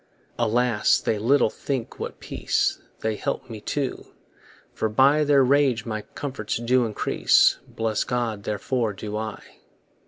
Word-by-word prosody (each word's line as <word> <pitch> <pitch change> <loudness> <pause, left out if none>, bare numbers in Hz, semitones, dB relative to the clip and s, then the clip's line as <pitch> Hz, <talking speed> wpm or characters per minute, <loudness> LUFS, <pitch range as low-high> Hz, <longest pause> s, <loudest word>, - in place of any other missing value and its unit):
Alas! 120 -1 +2
they 110 - -1
little 120 +1 +3
think 130 -5 -4
what - - -6
peace - - -1 0.2
They 110 -1 -1
help 120 - -4
me 110 -2 -7
to, 140 -3 -2 0.7
for 110 - -1
by 140 +7 +4
Their 140 -2 +4
rage 130 -3 +2
my 110 -2 -3
comforts 130 -7 -3
do 120 +1 +2
increase; 110 -2 +3
Bless 110 -2 -1
God, 120 -4 -2
therefore, 105 +3 -1
do 105 +1 -6
I. 110 0 -5
115 Hz, 135 wpm, -24 LUFS, 110-130 Hz, 0.7 s, by